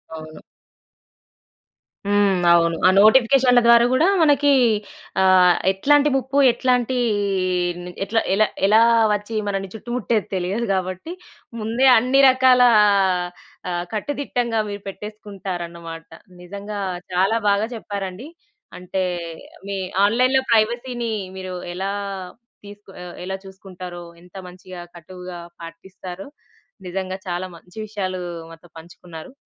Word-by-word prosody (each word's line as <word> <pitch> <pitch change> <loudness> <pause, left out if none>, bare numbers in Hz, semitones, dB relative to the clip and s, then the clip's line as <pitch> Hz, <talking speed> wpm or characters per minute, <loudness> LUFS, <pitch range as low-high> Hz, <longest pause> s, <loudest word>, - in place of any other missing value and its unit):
అవును. 155 0 -11 1.7
హ్మ్. 200 -2 +2
అవును. 170 -1 +2
ఆ - - +7
నోటిఫికేషన్‌ల 250 +3 +5
ద్వారా 235 0 +6
కూడా 315 +7 +3
మనకి 290 -2 +3 0.7
ఆహ్, 185 -1 +5 0.2
ఎట్లాంటి 290 +9 +3
ముప్పు 265 +1 -2
ఎట్లాంటి 250 0 0 1.1
ఎట్ల 215 +3 -3 0.2
ఎలా, 215 +2 +3 0.2
ఎలా 215 +3 +5 0.3
వచ్చి 210 +2 -4
మనల్ని 195 -1 -3
చుట్టుముట్టేది 225 -2 -2
తెలియదు 190 +6 -2
కాబట్టి. 185 - -4 0.5
ముందే 230 +5 0
అన్ని 255 +4 +3
రకాల 255 -1 +4 1.1
ఆ - - -3 0.2
కట్టుదిట్టంగా 240 -1 -2
మీరు 205 0 -6
పెట్టేసుకుంటారన్నమాట. 180 -5 -8 0.3
నిజంగా 200 +3 -7 0.3
చాలా 195 +5 +2
బాగా 200 +2 +1
చెప్పారండి. 200 +2 -6 0.5
అంటే 185 +1 -3 0.6
మీ 200 0 -3 0.3
ఆన్‌లైన్‌లో 255 +5 +2
ప్రైవసీ‌న్ని 235 +1 0 0.3
మీరు 185 -1 -6 0.2
ఎలా 190 +2 -3 0.7
తీసుకు 205 -1 -13 0.3
ఎలా 190 +1 -4
చూసుకుంటారో 185 -2 -10 0.2
ఎంత 180 +2 -20
మంచిగా 180 0 -11
కట్టువుగా 180 +1 -10 0.2
పాటిస్తారో 180 +2 -10 0.6
నిజంగా 185 +1 -4
చాలా 180 +1 -3
మంచి 180 +4 -18
విషయాలు 190 -3 -4 0.3
మాతో 165 +1 -15
పంచుకున్నారు. 165 +1 -12
200 Hz, 100 wpm, -21 LUFS, 180-235 Hz, 1.7 s, ఆ